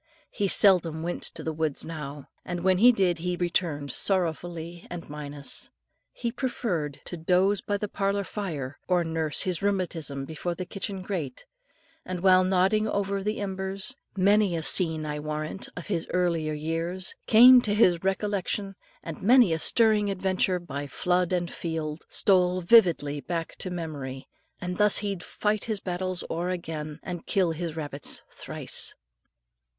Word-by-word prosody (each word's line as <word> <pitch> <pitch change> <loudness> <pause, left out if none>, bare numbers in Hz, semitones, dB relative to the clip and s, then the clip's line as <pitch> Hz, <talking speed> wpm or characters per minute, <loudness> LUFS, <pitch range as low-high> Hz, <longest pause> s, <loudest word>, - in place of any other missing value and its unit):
He 200 - -1
seldom 175 -5 +4
went 175 +1 -3
to 165 - +2
the 160 - -2
woods 155 -2 -2
now, 150 -3 -7 0.2
and 175 -1 -5
when 185 -1 +3
he 245 +4 +8
did 185 -7 +1
he 180 +1 -2
returned 170 -5 -1
sorrowfully 170 -2 -1
and 175 -1 -7
minus. 145 -1 -3 0.4
He 235 - -3
preferred 200 - -3
to - - -5
dose 185 +4 +2
by 205 - -1
the 210 - -3
parlour 200 0 -1
fire, 155 -11 -5
or 180 -2 +2
nurse 160 -2 -1
his 180 -3 -2
rheumatism 170 -8 -2
before 160 +3 -4
the 185 - -5
kitchen 195 0 -5
grate; 165 -10 -4 0.6
and 185 - -5
while 185 0 +6
nodding 190 +4 +2
over 200 -1 -1
the 210 +2 -2
embers, 195 +3 -3 0.2
many 200 -1 +3
a 165 - -3
scene, 160 -2 +4
I 150 0 -3
warrant, 155 +4 -3
of 180 - -6
his 170 -5 -2
earlier 165 -4 0
years 165 +4 -3
came 245 +3 +9
to 205 -3 -1
his 180 -6 +4
recollection, 195 0 -1 0.3
and 165 -2 -7
many 235 -4 +5
a 160 - -1
stirring 215 +3 +3
adventure 190 -1 +1
by 145 -5 -6
flood 180 +5 0
and 175 -2 -1
field 160 -2 -4
stole 185 -2 +3
vividly 170 -8 +4
back 165 0 -4
to 185 - -3
memory, 145 -7 -6 0.3
and 180 0 -4
thus 210 -1 +5
he'd 195 -3 -3
fight 210 +3 -2
his 220 -3 -2
battles 185 -1 -3
o'er 170 +2 -2
again, 155 -4 -5
and 175 -2 -6
kill 185 -4 +2
his 165 0 -4
rabbits 145 -3 -4
thrice. - - -1
180 Hz, 155 wpm, -27 LUFS, 160-195 Hz, 0.6 s, came